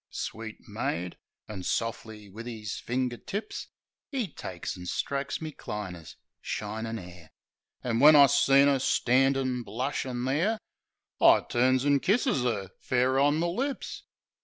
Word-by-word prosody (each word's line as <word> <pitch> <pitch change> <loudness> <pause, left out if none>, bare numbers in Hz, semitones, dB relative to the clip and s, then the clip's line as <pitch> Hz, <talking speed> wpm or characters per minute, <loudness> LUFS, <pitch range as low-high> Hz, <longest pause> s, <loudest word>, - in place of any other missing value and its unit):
Sweet 110 0 -6
maid." 90 +2 -3 0.3
An' 100 -3 -6
sof'ly 110 +1 -3
wiv 110 +5 -9
'is 110 -4 -5
finger 125 0 -2
tips, 205 - -5 0.4
'E 255 -9 -2
takes 90 -2 -6
an' 90 -1 -9
strokes 140 +6 -2
me 155 - -4
diner's 90 -6 -7 0.3
shinin' 110 +2 -4
'air. 90 -4 -11 0.5
An' 115 -2 0
when 150 +3 +9
I 140 -1 +9
seen 140 0 +5
'er 140 -1 +3
standin' 130 0 +2
blushin' 125 +1 -3
there, 165 +12 +1 0.6
I - - +7
turns 130 +2 +2
an' 140 -1 +4
kisses 205 - +2
'er, 100 -6 -1
fair 130 +1 +1
on 145 +2 +3
the 170 - +1
lips. 265 +10 -3
125 Hz, 135 wpm, -28 LUFS, 110-140 Hz, 0.6 s, when